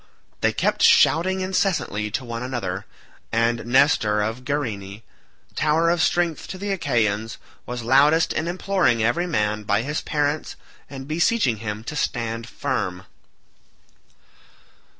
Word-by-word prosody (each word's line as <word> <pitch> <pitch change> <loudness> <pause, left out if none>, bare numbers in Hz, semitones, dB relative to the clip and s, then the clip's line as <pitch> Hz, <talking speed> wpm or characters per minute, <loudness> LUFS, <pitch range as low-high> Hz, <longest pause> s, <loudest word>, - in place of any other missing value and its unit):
They - - +2
kept - - 0
shouting 190 +3 +4
incessantly 185 - -1
to 130 +5 -3
one 115 -1 -5
another, 115 -7 -4 0.4
and 115 0 +1
Nestor 120 -5 +3
of 115 +4 -4
Gerene, 110 -7 -4 0.5
tower 160 +2 +2
of 170 -1 +1
strength 170 +1 0
to 185 - -7
the 200 +1 -3
Achaeans, 115 - 0 0.3
was 120 -1 -5
loudest 145 +7 +4
in 160 - -2
imploring 175 - +1
every 170 +11 +1
man 105 -8 0
by 105 +1 0
his 150 +4 -2
parents, 150 0 -1 0.3
and 135 -1 -8
beseeching 160 - +1
him 105 0 -5
to 150 - -6
stand 115 -4 -2
firm. 100 -10 -3
125 Hz, 130 wpm, -23 LUFS, 110-160 Hz, 0.5 s, shouting